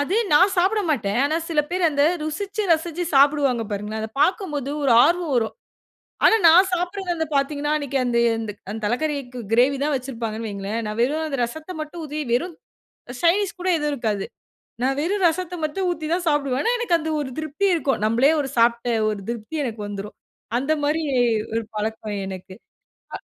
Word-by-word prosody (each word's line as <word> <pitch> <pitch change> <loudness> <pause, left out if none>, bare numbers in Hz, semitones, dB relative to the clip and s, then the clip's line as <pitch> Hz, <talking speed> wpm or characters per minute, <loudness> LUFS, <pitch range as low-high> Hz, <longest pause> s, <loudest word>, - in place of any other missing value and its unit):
அது 345 +9 0 0.2
நான் 370 +6 +6
சாப்பிட 390 +5 +3
மாட்டேன். 220 -5 0
ஆனா 310 +3 +1
சில 310 -3 +2
பேர் 365 0 -1
அந்த 285 -1 +1 0.2
ருசிச்சு, 400 +7 -3
ரசிச்சு 330 +2 -1
சாப்பிடுவாங்க 275 -4 +4
பாருங்களேன். 210 +2 -4
அத 220 - -4
பார்க்கும்போது 300 - 0
ஒரு 265 -4 +3
ஆர்வம் 340 -3 +1
வரும். 225 -2 0 0.7
ஆனா 445 - +7
நான் 365 +4 +7
சாப்பிடறது 360 +1 -2
வந்து 320 -2 -2
பார்த்தீர்கனா, 290 +2 0
அன்னைக்கு 280 -2 -2
அந்த 240 -1 0 0.5
அந்த 220 - -5
தலைக்கறிக்கு 255 0 -2
கிரேவி 260 +4 +4
தான் 300 0 0
வெச்சுருப்பாங்கனு 230 -4 -4
வையுங்களேன். 200 +3 -4
நான் 215 +2 -4
வெறும் 305 +6 +1
அந்த 275 -3 -3
ரசத்த 315 +9 -5
மட்டும் 315 +2 -7
ஊத்தி, 300 +1 -4
வெறும் 330 +7 -1 0.7
சைடு 345 +3 +4
டிஷ் 380 - -6
கூட 370 - 0
எதுவும் 295 -1 -1
இருக்காது. 215 -6 -2 0.6
நான் 270 +1 +1
வெறும் 380 +3 +1
ரசத்த 360 +2 -2
மட்டும் 370 +5 -2
ஊத்தி 315 -2 -5
தான் 355 - -4
சாப்பிடுவேன். 280 -3 0
ஆனா, 470 - +2
எனக்கு 355 -8 +2
அந்த 320 +1 -4
ஒரு 275 -3 -3
திருப்தி 315 +6 -2
இருக்கும். 285 -8 0
நம்மளே 240 +7 +4
ஒரு 270 - -4
சாப்பிட்ட 235 +1 +3 0.2
ஒரு 210 -2 -3
திருப்தி 235 +7 -5
எனக்கு 220 -3 -5
வந்துரும். 205 0 -7 0.4
அந்த 290 +4 0
மாதிரி 315 +2 0 0.5
ஒரு 230 - 0 0.2
பழக்கம் 215 -1 -3
எனக்கு. 185 0 -8 0.6
அ - - -5
290 Hz, 175 wpm, -23 LUFS, 235-335 Hz, 0.7 s, ஆனா